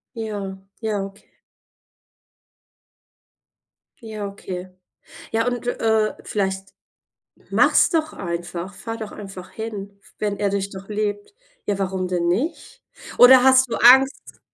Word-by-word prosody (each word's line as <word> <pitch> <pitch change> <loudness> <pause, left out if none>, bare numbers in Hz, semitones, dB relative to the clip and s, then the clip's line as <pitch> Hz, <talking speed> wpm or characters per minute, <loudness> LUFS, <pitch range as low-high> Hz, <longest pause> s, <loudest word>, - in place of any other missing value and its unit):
Ja, 205 -4 -4 0.2
ja, 215 -3 -1
okay. 195 0 -13 2.7
Ja, 215 -3 -6
okay. 185 -2 -7 0.6
Ja 225 +1 0
und, 245 -1 -2
äh, 220 -3 +1
vielleicht 195 -1 -3 0.8
mach's - - +4
doch 315 -2 0
einfach, 175 +1 -5
fahre 225 +4 -6
doch 215 - -6
einfach 195 -3 -9
hin, 200 -3 -7 0.2
wenn 205 -1 -1
er 200 -1 0
dich 200 0 -2
doch 195 0 -10
liebt. 205 - -3 0.3
Ja, 200 -1 -1
warum 190 -1 -1
denn 175 -1 -1
nicht? 230 - -2 0.3
Oder 250 0 +9
hast 260 -1 +6
du - - 0
Angst? 265 +4 +5
205 Hz, 120 wpm, -22 LUFS, 190-225 Hz, 2.7 s, Oder